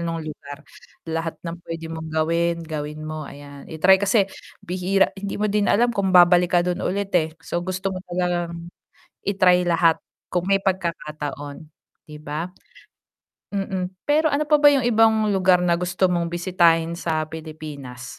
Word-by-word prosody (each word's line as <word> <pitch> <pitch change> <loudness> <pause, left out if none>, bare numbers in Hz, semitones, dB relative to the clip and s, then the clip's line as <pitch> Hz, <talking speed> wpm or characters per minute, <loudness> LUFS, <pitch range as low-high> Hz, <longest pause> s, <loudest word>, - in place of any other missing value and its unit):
nung 165 -1 -3
lugar, 145 -1 -9 0.4
lahat 165 0 -3
ng 170 +1 -5
puwede 165 -1 -7
mong 160 0 -6
gawin, 165 +2 +1
gawin 150 -1 -5
mo, 155 -1 -5
ayan 140 0 -12
i-try 185 +4 +4
kasi, 200 0 +3 0.4
bihira 185 +2 +1
hindi 200 0 -4
mo 210 - -1
din 205 0 +1
alam 240 +3 +3
kung 195 -3 0
babalik 175 0 +6
ka - - +5
dun 180 0 -2
ulit 200 +1 -2
eh, 160 0 -3
so 175 - -2
gusto 185 +2 -3
mo 185 - -4
talagang 175 -1 -2 0.6
i-try 180 -2 +4
lahat 165 -1 +3 0.3
kung 180 0 0
may 195 0 +3
pagkakataon, 150 -5 -4 0.4
'di 150 0 -10
ba? 155 +3 -4 1.1
Mm, 190 -2 -2 0.2
pero 305 +2 +3
ano 290 +2 +1
pa 300 - +6
ba 290 - +5
yung 270 -3 +2
ibang 220 -2 +4
lugar 185 -2 +4
na 170 -1 +2
gusto 180 +1 +1
mong 170 -1 0
bisitahin 170 -2 +2
sa 160 -2 -1
Pilipinas? 150 -6 -9
175 Hz, 160 wpm, -23 LUFS, 160-190 Hz, 1.1 s, babalik